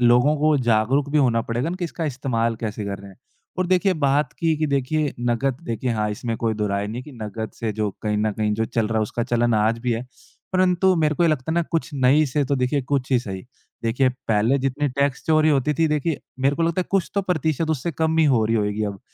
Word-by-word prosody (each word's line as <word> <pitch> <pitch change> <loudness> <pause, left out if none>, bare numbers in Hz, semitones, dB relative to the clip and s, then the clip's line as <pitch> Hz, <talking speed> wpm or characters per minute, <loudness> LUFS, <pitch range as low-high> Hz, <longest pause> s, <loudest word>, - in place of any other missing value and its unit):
लोगों 125 +5 +4
को 150 +1 +3
जागरूक 120 +6 +2
भी 150 - +2
होना 120 -5 +3
पड़ेगा 120 +6 -2
ना 175 - -3
कि 180 - -2
इसका 165 0 -4
इस्तेमाल 120 -5 -1
कैसे 110 -1 -4
कर 100 -1 -4
रहे 100 0 -11
हैं - - -17 0.4
और 185 - +1
देखिए 185 +2 +3
बात 140 +2 +2
की, 165 -2 0
कि 155 +1 0
देखिए 140 +2 0
नक़द 120 +2 0
देखिए 120 0 -2
हाँ, 105 -2 0
इसमें 115 +2 -3
कोई 115 -1 -1
दो 105 0 -1
राय 100 0 -1
नहीं 115 +4 -5
कि 145 +2 -12
नक़द 110 +1 -5
से 110 -2 -1
जो 105 0 -1
कहीं 105 -1 0
न 105 0 +1
कहीं 105 0 -1
जो 110 +1 0
चल 115 -1 -1
रहा 110 -1 0
है, - - +2
उसका 115 +2 -2
चलन 120 -1 +1
आज 110 +2 +2
भी 120 +1 -1
है। 115 +2 -3 0.5
परंतु 185 0 +3
मेरे 155 -2 +2
को 175 - +1
ये 170 - +4
लगता 155 -2 -1
है - - -1
ना 170 - +2
कुछ 165 - 0
नहीं 140 +3 +4
से 145 0 +2
तो 140 +1 0
देखिए 130 +2 0
कुछ 135 0 -2
ही 125 - +5
सही। 95 -6 -6 0.4
देखिए, 125 +3 +2 0.2
पहले 110 +4 +3
जितनी 135 +2 -1
टैक्स 140 0 -1
चोरी 155 -1 +4
होती 145 0 +2
थी, 165 +2 +2
देखिए, 150 0 -1 0.2
मेरे 140 +2 +2
को 165 - 0
लगता 170 +2 +1
है - - -1
कुछ 195 -3 +1
तो 200 - +1
प्रतिशत 160 -3 0
उससे 160 +2 -1
कम 160 +1 0
ही 160 - +5
हो 125 -6 +3
रही 115 +1 +1
होएगी 105 0 -1
अब। 100 -2 -5
130 Hz, 255 wpm, -23 LUFS, 115-155 Hz, 0.5 s, ही